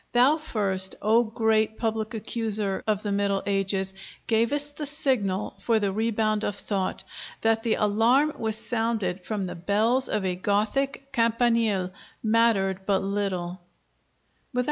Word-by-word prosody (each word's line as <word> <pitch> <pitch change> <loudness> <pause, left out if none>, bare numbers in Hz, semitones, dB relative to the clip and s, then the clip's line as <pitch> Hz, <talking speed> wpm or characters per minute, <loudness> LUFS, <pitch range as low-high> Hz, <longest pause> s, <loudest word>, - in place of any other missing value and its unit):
Thou 255 +6 +5
first, 195 -10 0
O 225 +3 +4
great 220 -1 +1
public 220 -1 -2
accuser 215 -3 -2
of 210 -1 0
the 205 - -2
Middle 200 -1 0
Ages, 195 -1 0 0.3
gavest 285 +6 +1
the 300 - -3
signal 250 -10 0
for 230 -2 +2
the 200 -2 -1
rebound 215 0 0
of 205 - -1
thought. 195 -3 -3 0.4
That 225 0 +2
the 230 -1 +1
alarm 230 +8 +3
was 220 -1 0
sounded 220 -7 -1
from 205 -1 -3
the 180 - -5
bells 220 +9 +1
of 210 -3 -1
a 180 -1 0
Gothic 220 +9 -1
campanile 230 -5 +2 0.3
mattered 215 -4 +2
but 195 -2 +2
little.'" 190 -3 -2
215 Hz, 135 wpm, -26 LUFS, 195-230 Hz, 0.4 s, Thou